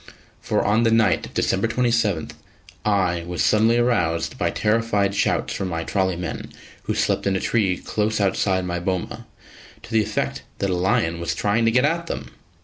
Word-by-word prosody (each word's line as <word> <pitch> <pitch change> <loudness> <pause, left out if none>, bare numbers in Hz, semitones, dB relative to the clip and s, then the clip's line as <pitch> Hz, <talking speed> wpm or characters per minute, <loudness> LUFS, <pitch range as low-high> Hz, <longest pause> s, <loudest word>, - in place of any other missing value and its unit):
For - - 0
on 105 +3 +3
the 115 - +3
night 110 -4 +2
of - - -18
December 95 +4 +1
27, 115 -7 0 0.5
I 95 -5 +1
was 90 -1 -1
suddenly 110 +2 +4
aroused 90 -10 +1
by - - 0
terrified 105 -2 +1
shouts - - 0
from 95 - -3
my 85 -2 -3
trolley 95 0 0
men, 90 -1 -5 0.3
who - - -1
slept - - 0
in 95 - +1
a - - +1
tree 95 -5 +1
close 110 0 -1
outside 95 -1 +1
my 90 0 -2
boma, 90 0 -3 0.6
to 115 - -12
the 110 -1 +3
effect 110 0 -2 0.2
that 100 -1 -1
a - - +1
lion 85 -2 +1
was 85 - -2
trying 115 +3 +1
to 115 - +4
get 125 +3 +3
at 170 +2 -1
them. - - -5
100 Hz, 185 wpm, -22 LUFS, 90-115 Hz, 0.6 s, suddenly